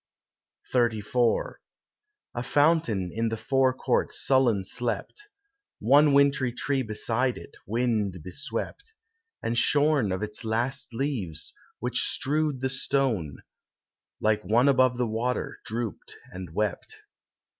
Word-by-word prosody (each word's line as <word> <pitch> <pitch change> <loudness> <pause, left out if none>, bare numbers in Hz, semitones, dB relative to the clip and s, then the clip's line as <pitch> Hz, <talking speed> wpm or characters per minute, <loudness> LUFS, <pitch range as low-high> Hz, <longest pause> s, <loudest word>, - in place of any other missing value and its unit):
XXXIV 120 -1 +1 0.8
A 120 - -3
fountain 135 - +2
in 115 +1 0
the 115 - -3
forecourt 130 +2 +1
sullen 125 -7 +2
slept, 120 - -4 0.5
One 145 +6 +5
wintry 140 -2 +3
tree 135 +2 -1
beside 120 +2 -1
it, - - -12
wind 110 -4 0
beswept, 410 - -5 0.5
And 115 - -1
shorn 145 -3 +3
of 95 +3 -2
its 105 +2 -3
last 115 +4 -1
leaves, 115 - -1 0.2
which - - 0
strewed 150 -1 0
the 130 - 0
stone, 125 - -1 0.8
Like 110 -1 +2
one 115 +8 +3
above 130 -2 +4
the 125 - +1
water, 115 +3 -2
drooped 115 -1 -4 0.2
and 90 -2 -7
wept. 105 -2 -2
120 Hz, 115 wpm, -27 LUFS, 110-135 Hz, 0.8 s, One